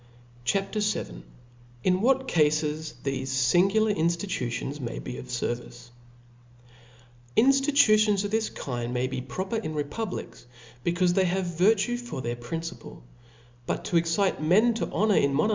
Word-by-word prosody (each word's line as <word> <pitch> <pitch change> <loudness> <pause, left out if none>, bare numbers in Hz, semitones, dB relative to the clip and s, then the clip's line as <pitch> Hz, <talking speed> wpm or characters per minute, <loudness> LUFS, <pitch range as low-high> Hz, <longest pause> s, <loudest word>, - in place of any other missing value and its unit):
CHAP. 195 +7 0
VIL 215 - 0
Xn 120 - -3
what 265 +2 +2
Cq/e 155 -8 +4 0.6
thefe 135 -1 -2
Jingular 175 - +2
Infiitutions 160 -6 -2
may 120 -2 -4
b^ 125 - -6
of 130 - -9
Service^ 120 0 -4 1.4
"INSTITUTIONS 235 -6 +4
of 205 - -3
this 220 0 0
kind 120 -2 -4
may 125 +1 +1
be 130 -1 -3
proper 190 - -4
'*• - - -10
in 155 - -4
republics, 150 - -5 0.4
becaufe 175 +1 +2
they 190 +1 +3
have 185 +1 0
virtue 200 +7 +2
for 240 - -6
their 120 -1 -3
principle; 165 +8 -7 0.6
but - - -2
to 175 - +1
excite 170 +2 +1
men 205 +10 +4
to 225 - -3
honor 210 -1 +2
in 140 0 +2
nno 155 +8 +3
narchics. - - 0
175 Hz, 145 wpm, -27 LUFS, 130-210 Hz, 1.4 s, Cq/e